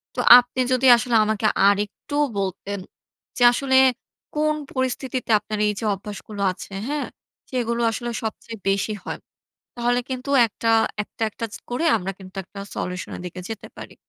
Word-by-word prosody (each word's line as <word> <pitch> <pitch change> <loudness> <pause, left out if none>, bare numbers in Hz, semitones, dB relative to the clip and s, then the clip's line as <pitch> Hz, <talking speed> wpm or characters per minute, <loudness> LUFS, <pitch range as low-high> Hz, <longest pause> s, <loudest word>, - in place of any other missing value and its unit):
তো - - -4 0.2
আপনি 245 +1 -5
যদি 255 +1 +2
আসলে 235 0 0
আমাকে 215 0 -1 0.2
আরেকটু 205 +8 -1 0.2
বলতেন 195 +1 -3 0.6
যে - - -5
আসলে 265 +2 0 0.6
কোন 305 0 +2 0.2
পরিস্থিতিতে 260 -1 -2
আপনার 215 0 -5
এইযে 210 +2 -2
অভ্যাসগুলো 205 +1 -7
আছে 195 +1 -10
হ্যাঁ, 295 0 -2 0.4
সেগুলো 235 -2 -1
আসলে 240 +1 -4
সবচেয়ে 225 +1 -5
বেশি 200 +2 0
হয়। - - -5 0.6
তাহলে 245 +1 +1
কিন্তু 255 +1 -5 0.2
একটা 230 +1 -5 0.4
একটা, 225 - -20
একটা 230 +2 -5 0.2
করে 245 +7 -1
আমরা 195 -1 -4
কিন্তু 185 0 -13
একটা 200 +2 -11 0.2
সলিউশনের 180 0 -5
দিকে 180 +1 -7
যেতে 220 - -6
পারি। - - -10
225 Hz, 145 wpm, -23 LUFS, 200-250 Hz, 0.6 s, যদি